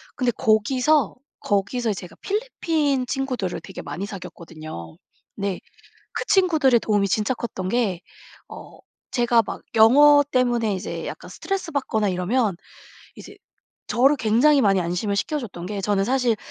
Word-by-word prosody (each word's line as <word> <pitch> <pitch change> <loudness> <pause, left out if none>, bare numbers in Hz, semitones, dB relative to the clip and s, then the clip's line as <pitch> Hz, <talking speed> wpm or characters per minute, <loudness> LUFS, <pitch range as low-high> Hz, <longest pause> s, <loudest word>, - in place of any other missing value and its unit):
근데 250 -3 +1
거기서, 250 +7 +2 0.2
거기서 210 +3 -1
제가 180 -2 -9
필리핀 325 - -1
친구들을 250 - -3
되게 - - -9
많이 145 +7 -5
사귀었거든요. 155 - -9 0.4
네. 200 -2 -3 0.5
그 - - -3
친구들의 315 - +4
도움이 205 -2 +1
진짜 215 +6 0
컸던 205 -6 -5
게 200 -5 0 0.5
어 - - -12 0.3
제가 240 -2 +3
막 - - -6
영어 285 +6 +7
때문에 240 -4 +1
이제 185 - -5
약간 - - -8
스트레스 390 -4 -4
받거나 220 -7 0
이러면 195 +4 0 0.6
이제 - - -12 0.5
저를 270 +4 +4
굉장히 255 +6 +3
많이 195 -5 +3
안심을 180 +4 -2
시켜줬던 210 - -3
게 200 +1 -4
저는 195 0 +1
사실 245 -1 +1
225 Hz, 310 characters per minute, -23 LUFS, 195-265 Hz, 0.6 s, 영어